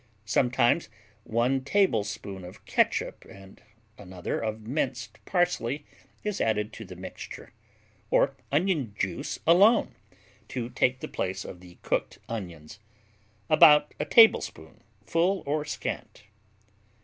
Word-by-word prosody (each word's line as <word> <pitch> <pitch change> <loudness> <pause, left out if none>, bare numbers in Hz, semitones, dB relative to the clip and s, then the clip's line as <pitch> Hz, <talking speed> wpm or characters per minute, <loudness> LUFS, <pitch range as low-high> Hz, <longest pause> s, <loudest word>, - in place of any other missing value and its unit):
Sometimes 125 +6 +2 0.4
1 125 +4 +1
tablespoon 110 - 0
of 90 +1 -12
catsup - - 0
and 95 -1 -15 0.4
another 90 -3 -4
of 110 -1 -3
minced 120 -4 -3
parsley 155 -6 0 0.4
is 210 -2 -2
added 105 0 0
to - - -8
the 90 -1 -10
mixture. 95 +1 -9 0.6
Or - - +3 0.2
onion 145 - 0
juice 95 -3 -3
alone, 180 - +5 0.5
to 120 -1 -5
take 125 +1 +1
the - - -4
place 95 0 -3
of 90 - -9
the 90 -1 -15
cooked - - -1
onions 90 -6 -7 0.7
about 150 +3 +6
a - - -1
tablespoon, 150 - +4 0.2
full 180 - +1
or 150 +1 -1
scant. 145 - -5
120 Hz, 115 wpm, -27 LUFS, 100-150 Hz, 0.7 s, about